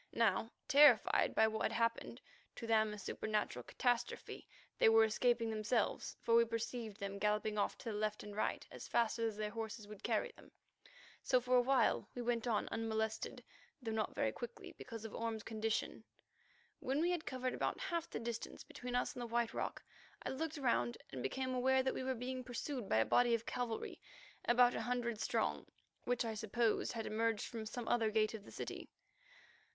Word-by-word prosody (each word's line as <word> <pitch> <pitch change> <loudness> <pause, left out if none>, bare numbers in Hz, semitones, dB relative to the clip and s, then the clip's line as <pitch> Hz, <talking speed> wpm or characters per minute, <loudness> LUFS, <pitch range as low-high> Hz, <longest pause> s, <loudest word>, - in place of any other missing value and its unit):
Now, 220 -1 +2 0.2
terrified 280 -6 +6
by 220 - +6
what 220 0 -2
had - - +1
happened, 230 0 -1 0.3
to 235 - -6
them 220 -1 +3
a 210 - -6
supernatural 210 - -2
catastrophe, 245 - -1 0.3
they - - +7
were 225 0 +7
escaping 230 +1 +2
themselves, 215 +1 0
for 230 - +2
we 235 0 +8
perceived 230 -1 -3
them 200 -1 -4
galloping 210 0 +1
off - - 0
to 230 - -5
the - - -4
left 215 0 -1
and 205 -1 -8
right 215 - -1
as - - -8
fast 230 0 +1
as 225 -2 -1
their 210 -1 -2
horses 220 -1 -5
would 210 -1 -10
carry - - 0
them. - - -18 0.7
So 255 - +3
for 250 +1 +1
awhile 255 +2 +3
we 245 - -3
went 235 0 0
on 220 -3 +1
unmolested, 220 -1 -2 0.4
though 235 -4 -4
not 220 -1 -1
very - - +1
quickly, 480 0 -7
because 230 -3 -8
of 225 - -7
Orme's 225 -2 -3
condition. 220 0 -2 0.8
When 270 +3 0
we 345 +3 +2
had 345 -3 -2
covered 255 -1 -2
about - - -1
half 340 -3 -2
the - - -4
distance 230 0 -5
between 245 0 -6
us 250 - +1
and 250 - -6
the 240 - -3
White 235 0 0
Rock, - - -3 0.4
I - - -2
looked 310 +3 -3
round 230 - +1
and 130 - -5
became 255 - -2
aware 260 +1 +3
that 265 - +1
we - - -3
were 260 0 0
being 255 +2 -4
pursued 250 -1 -4
by - - +3
a 110 - +4
body 240 -1 +4
of 230 0 -4
cavalry 240 -3 -3 0.4
about 245 0 +5
a - - -2
hundred 240 -3 -1
strong, - - 0 0.4
which 245 -1 +1
I 225 - -2
supposed 220 +2 0
had 225 -2 -3
emerged 225 0 0
from 225 -2 -5
some 240 +1 -5
other 225 -2 +3
gate 215 0 +2
of 210 -2 -7
the - - -12
city. - - -6
230 Hz, 190 wpm, -37 LUFS, 215-245 Hz, 0.8 s, we